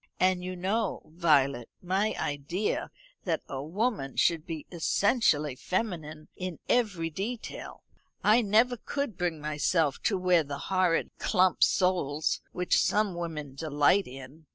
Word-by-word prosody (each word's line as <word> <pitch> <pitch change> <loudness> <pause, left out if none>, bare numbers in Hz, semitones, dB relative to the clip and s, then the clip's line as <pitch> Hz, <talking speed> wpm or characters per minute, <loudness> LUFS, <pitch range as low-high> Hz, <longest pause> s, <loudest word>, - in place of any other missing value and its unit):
And 185 -1 +2
you 185 0 -4
know, 195 +4 -1
Violet, 140 -7 +2
my 195 +4 0
idea 150 +8 -2 0.4
that - - -1
a 135 -1 -4
woman 175 - -2
should 165 0 +2
be 160 -3 -5
essentially 170 - +2
feminine 160 - -3
in 180 -3 -5
every 185 -9 +1
detail. 215 +8 -6 0.4
I 220 +3 +5
never 230 +4 +3
could 280 -1 -3
bring 175 -3 -2
myself 150 0 0
to 200 - +2
wear 180 -2 +3
the 140 -1 -5 0.2
horrid 185 -3 +2
clump 185 -3 +2
soles 165 -5 +1
which 180 0 +2
some 210 -2 +1
women 160 -5 -5
delight 150 +6 +2
in. 135 +4 -11
175 Hz, 130 wpm, -29 LUFS, 150-195 Hz, 0.4 s, I